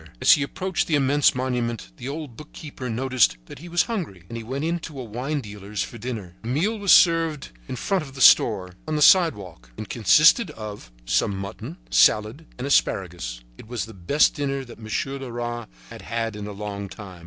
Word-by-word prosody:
As - - +5
he - - +6
approached 175 +4 -2
the 160 - +2
immense 140 0 +3
monument, 120 - -2
the 130 - -6
old 145 -4 -6
bookkeeper 145 -2 -9
noticed 125 - +2
that - - -11
he 175 +3 -10
was 175 0 +3
hungry, 170 - -5
and 115 - -7
he 115 - -5
went 135 +6 -4
into 165 -4 -4
a - - -4
wine 125 +6 -3
dealer's 105 -2 -5
for 120 - -9
dinner. 110 -7 -6
The 115 - -8
meal 185 - 0
was 200 -2 +2
served 165 - +4 0.2
in - - -5
front 190 +9 -1
of 135 -2 -12
the - - -9
store, 95 -7 +5
on 155 - -1
the 150 - +3
sidewalk. 100 - +3
It 105 - -7
consisted 155 - +5
of 105 - -9
some 95 +10 +1
mutton, 95 -1 -7
salad 110 +10 +3
and 125 - -5
asparagus. 90 - 0 0.2
It - - -12
was 120 -1 -3
the 110 - -12
best 100 - +2
dinner 140 -2 -3
that 120 - -13
Monsieur 135 +5 -3
Leras 120 -2 -5 0.2
had - - -9
had 115 -1 -3
in 105 0 -6
a - - -6
long 100 -1 -6
time. 95 -4 -10
125 Hz, 200 wpm, -24 LUFS, 105-150 Hz, 0.2 s, he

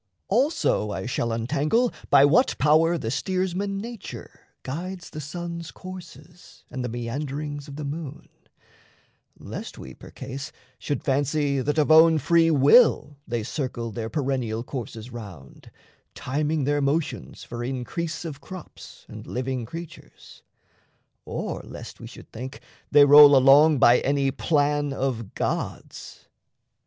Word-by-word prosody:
Also 240 - +1
I 95 -1 -4
shall 120 -1 -2
untangle 150 - 0 0.2
by 135 - +7
what 210 - +3
power 160 +3 +3
The 115 -7 -4
steersman 190 +4 -2
nature 230 +1 -9 0.2
guides 175 +6 -6
the 155 - -6
sun's 170 +2 -6
courses, 180 -1 -12
And 130 - -4
the 125 - -3
meanderings 145 +5 -5
of 140 - -9
the 150 0 -5
moon, 145 0 -6 1.1
lest - - -8
we, - - -10
Percase, 135 +1 -8 0.3
should 145 - -3
fancy 140 0 0
that 150 +4 -1
of 155 0 +3
own 160 0 +7
free 165 +1 +3
will 145 - +5
They 115 -1 -2
circle 120 -2 -4
their 110 +1 -5
perennial 130 -6 -2
courses 120 -2 -7
round, 100 - -11 0.5
Timing 150 +3 -1
their 145 +2 +1
motions 140 - -2
for 120 0 -6
increase 135 +7 -4
of 145 -3 -7
crops 185 +3 -11
And - - -10
living 130 -2 -3
creatures, 165 +4 -11 0.8
or - - -4
lest - - -10
we - - -9
should - - -14
think 130 +4 -8 0.3
They 145 -1 +7
roll 145 0 +9
along 140 +3 +6
by 120 0 +6
any 140 -1 +1
plan 145 -1 0
of 125 -6 -3
gods. - - -5
145 Hz, 130 wpm, -25 LUFS, 130-160 Hz, 1.1 s, roll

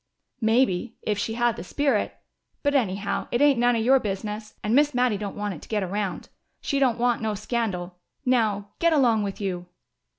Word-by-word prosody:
"Maybe 225 -1 +2
if 210 -2 -1
she 225 +2 -2
had 240 -1 +1
the - - -6
spirit. 275 +2 0 0.5
But, 285 -1 +2
anyhow, 200 -6 0
it 240 - +1
ain't 285 -3 +5
none 245 0 +4
of 225 - 0
your 265 +2 +6
business, 210 0 -4
and 210 - 0
Miss 290 +1 +4
Mattie 250 -3 +2
don't 205 -2 -5
want 205 -1 -3
it 155 - -10
to - - -14
get 210 -3 0
around. 195 +1 -3 0.3
She 280 - -1
don't 255 -4 +3
want 240 -1 +1
no 215 -1 -1
scandal. 195 -5 -3 0.3
Now 215 -5 +1
get 335 -1 +3
along 240 -7 +4
with 200 -1 -4
you!" 180 -3 -3
220 Hz, 195 wpm, -25 LUFS, 205-245 Hz, 0.5 s, your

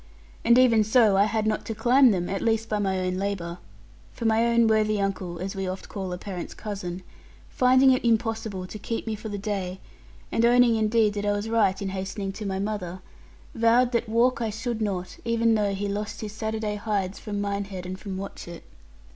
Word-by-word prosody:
And 235 +1 +5
even 235 -4 +5
so, 220 -2 +4
I 200 +1 +5
had 215 0 -1
not 215 0 0
to 225 - -3
climb 250 +4 +5
them, 180 -5 0
at 195 - -3
least 225 -1 +1
by 210 - 0
my 190 -2 0
own 185 0 -1
labour. 185 -3 -3 0.5
For 235 - -7
my 225 0 +3 0.2
most 230 -1 +5
worthy 215 -1 +2
uncle 190 -3 -2
(as 190 +3 -5
we 195 -1 -3
oft 185 +1 -6
call 190 -3 -5
a 180 - -3
parent's 185 -2 -6
cousin), 185 -4 -6 0.5
finding 260 +1 +5
it 255 - +1
impossible 220 -4 0
to 210 +3 -8
keep 230 +2 -4
me 220 - -2
for 215 +1 -6
the 205 - -4
day, 195 -3 -3 0.5
and 230 - +1
owning 240 0 +5
indeed 220 -1 +2
that 205 0 -3
I 205 - +3
was 205 +2 -3
right 215 -4 +2
in 195 - -3
hastening 195 +1 -4
to 210 +1 -6
my 190 -1 -2
mother, 190 -3 -4 0.5
vowed 235 +2 +3
that 235 -2 -1
walk 235 +3 +2
I 225 - 0
should 225 +1 -4
not, 190 -4 -3
even 230 -1 +2
though 205 -2 +1
he 205 +1 -2
lost 210 +2 -4
his 215 -2 -5
Saturday 220 0 -3
hides 205 -3 -2
from 205 -1 -4
Minehead 200 -2 -3
and 185 +1 -6
from 195 -3 -6
Watchett. 175 -3 -8
210 Hz, 205 wpm, -26 LUFS, 195-225 Hz, 0.5 s, And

